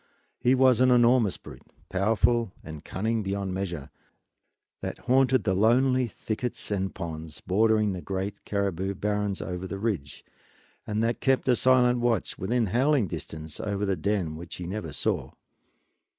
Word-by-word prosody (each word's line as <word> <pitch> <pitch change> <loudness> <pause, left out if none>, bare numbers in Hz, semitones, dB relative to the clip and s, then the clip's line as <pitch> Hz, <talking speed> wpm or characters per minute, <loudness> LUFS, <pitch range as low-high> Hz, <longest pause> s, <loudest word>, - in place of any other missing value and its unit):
He 125 +2 +3
was 130 -2 +4
an 130 - +5
enormous 120 -4 +4
brute, - - -12 0.3
powerful 110 +3 +2
and 80 -1 -9
cunning 110 +6 -1
beyond 100 -1 -2
measure, 85 -7 -4 0.9
that - - -4
haunted 130 -2 +3
the 95 - +1
lonely 125 +5 +3
thickets 115 +1 -4
and 95 -1 -1
ponds 80 -4 -6
bordering 110 +1 +2
the 90 - -5
great 95 +2 -4
caribou 100 -1 -1
barrens 105 0 -1
over 90 0 -5
the 100 - -5
ridge, 95 -10 -3 0.6
and 110 +1 0
that 115 +1 -1
kept 135 -1 +2
a 125 - +5
silent 125 -1 +4
watch, 120 -1 0
within 115 +5 +1
howling 125 - +2
distance, 80 0 -7
over 100 -1 -2
the 95 -1 +1
den 90 -2 -1
which 85 +2 -8
he 90 - -6
never 90 -3 -4
saw. - - -2
105 Hz, 150 wpm, -27 LUFS, 95-120 Hz, 0.9 s, an